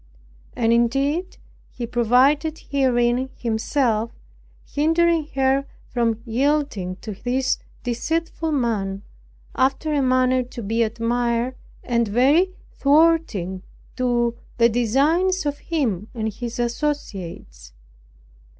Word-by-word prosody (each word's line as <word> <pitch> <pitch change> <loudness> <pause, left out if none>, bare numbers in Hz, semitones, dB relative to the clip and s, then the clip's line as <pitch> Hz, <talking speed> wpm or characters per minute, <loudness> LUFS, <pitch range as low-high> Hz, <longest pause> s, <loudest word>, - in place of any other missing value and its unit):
And 230 0 +2
indeed 275 +10 +1 0.3
He 240 - -5
provided 255 +7 +3
herein 255 -2 +2
Himself, 230 0 0 0.6
hindering 325 +1 +2
her 270 +1 +2 0.3
from 230 -2 0
yielding 250 -6 0
to 215 - -6
this 255 +5 -1 0.2
deceitful 320 +6 -2
man, 205 -8 -1 0.5
after 275 +4 +1
a 290 - +2
manner 255 0 +3
to 245 -1 -7
be 225 +3 0
admired, 235 +2 0 0.3
and 235 -2 +1
very 275 - +4 0.2
thwarting 285 - +2 0.3
to 240 -2 +1 0.2
the 235 0 +5
designs 295 - +2
of 290 0 -2
him 230 - -1
and 220 -2 -2
his 235 +2 -6
associates. 200 - -4
245 Hz, 100 wpm, -22 LUFS, 230-290 Hz, 0.6 s, the